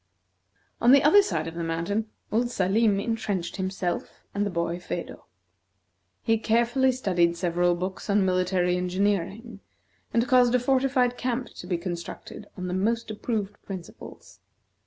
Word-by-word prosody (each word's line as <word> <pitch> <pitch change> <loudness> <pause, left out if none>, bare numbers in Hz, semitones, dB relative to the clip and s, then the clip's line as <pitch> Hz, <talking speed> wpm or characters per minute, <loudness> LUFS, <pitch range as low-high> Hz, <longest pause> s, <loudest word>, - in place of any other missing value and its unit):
On 240 +2 +6
the 280 - +6
other 360 +8 +7
side 165 - -2
of 165 - -6
the 170 0 -4
mountain, 170 +7 -2 0.2
old 240 +3 +1
Salim 200 0 +2
intrenched 200 -5 -2
himself 190 -2 -3
and 200 - 0
the - - -2
boy, 170 -1 -2
Phedo. 180 - -6 1.0
He 225 -1 +2
carefully 240 +4 +2
studied 175 -9 +1
several 175 0 +1
books 185 +4 -5
on 200 -1 +3
military 180 -1 +1
engineering, 200 +4 -1 0.5
and 235 +1 +1
caused 250 -2 +5
a - - +4
fortified 255 -1 +2
camp 250 0 -2
to 180 - -10
be 175 -2 0
constructed 175 +3 -7
on 180 - -4
the 180 - -3
most 225 +4 0
approved 210 -2 -3
principles. 185 -3 -10
200 Hz, 145 wpm, -26 LUFS, 180-235 Hz, 1.0 s, other